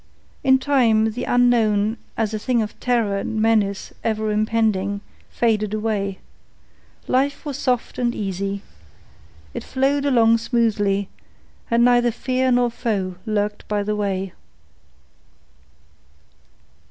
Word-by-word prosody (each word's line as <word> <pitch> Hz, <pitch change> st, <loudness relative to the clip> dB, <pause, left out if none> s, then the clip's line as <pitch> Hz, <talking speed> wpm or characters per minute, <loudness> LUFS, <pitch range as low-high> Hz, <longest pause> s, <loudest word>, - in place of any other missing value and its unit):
In 265 Hz, -1 st, +5 dB
time, 235 Hz, -6 st, +3 dB
the 245 Hz, -, -4 dB
unknown, 225 Hz, -3 st, +2 dB, 0.2 s
as 220 Hz, -1 st, 0 dB
a 215 Hz, -, -2 dB
thing 240 Hz, 0 st, +1 dB
of 210 Hz, -, -8 dB
terror 230 Hz, -5 st, +1 dB
and 220 Hz, +2 st, -3 dB
menace 215 Hz, -3 st, +1 dB
ever 215 Hz, -1 st, 0 dB
impending, 210 Hz, -2 st, 0 dB, 0.3 s
faded 215 Hz, -3 st, 0 dB
away. 205 Hz, -3 st, -2 dB, 0.9 s
Life 280 Hz, +4 st, 0 dB
was 285 Hz, -2 st, -3 dB
soft 250 Hz, -3 st, -1 dB
and 240 Hz, -1 st, 0 dB
easy. 195 Hz, 0 st, -3 dB, 0.9 s
It -, -, -5 dB
flowed 275 Hz, +2 st, 0 dB
along 230 Hz, -3 st, +4 dB
smoothly, 210 Hz, -4 st, +1 dB, 0.6 s
and 235 Hz, +1 st, +4 dB
neither 245 Hz, -1 st, +4 dB
fear 255 Hz, +2 st, 0 dB
nor 245 Hz, -1 st, +3 dB
foe 200 Hz, -6 st, -2 dB
lurked 210 Hz, -1 st, -2 dB
by 205 Hz, -1 st, 0 dB
the 210 Hz, +1 st, -1 dB
way. 195 Hz, -2 st, -2 dB
220 Hz, 115 wpm, -22 LUFS, 205-245 Hz, 0.9 s, In